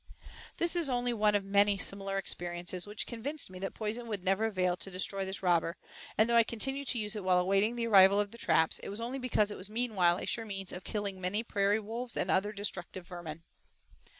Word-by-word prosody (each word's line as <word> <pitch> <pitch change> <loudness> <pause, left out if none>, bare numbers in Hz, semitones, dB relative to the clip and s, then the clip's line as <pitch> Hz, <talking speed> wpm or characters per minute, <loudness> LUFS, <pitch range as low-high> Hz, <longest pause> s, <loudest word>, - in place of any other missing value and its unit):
This 340 +1 +2
is 335 -5 0
only 245 -1 0
one 210 -2 +2
of 205 - +1
many 200 0 +4
similar 195 0 0
experiences 175 0 -3
which 210 +1 -4
convinced 255 +1 -4
me 185 - -9
that 195 - -5
poison 225 +2 -3
would 205 -5 -3
never 195 +4 +2
avail 185 -4 0
to 195 - -3
destroy 195 +1 -1
this 190 +1 -5
robber, 170 -1 +1 0.4
and 220 - +5
though 235 - +2
I 235 - +8
continued 270 +5 0
to 250 - +1
use 210 -1 -2
it 210 - -5
while 185 -1 +3
awaiting 195 +5 +2
the 235 -1 -2
arrival 200 -2 +6
of 205 -1 -1
the 235 - -11
traps, 160 -6 +2
it - - -8
was 200 +2 -5
only 245 +4 -4
because 220 -5 +1
it - - -6
was 185 +2 -5
meanwhile 210 -7 +2
a - - -5
sure 230 - -1
means 195 -3 -4
of 180 - -7
killing 200 -3 -4
many 195 +5 0
prairie 205 -1 +1
wolves 230 +3 -5
and - - 0
other 200 +2 +1
destructive 190 -3 -3
vermin. 165 -3 -8
205 Hz, 225 wpm, -31 LUFS, 185-230 Hz, 0.4 s, I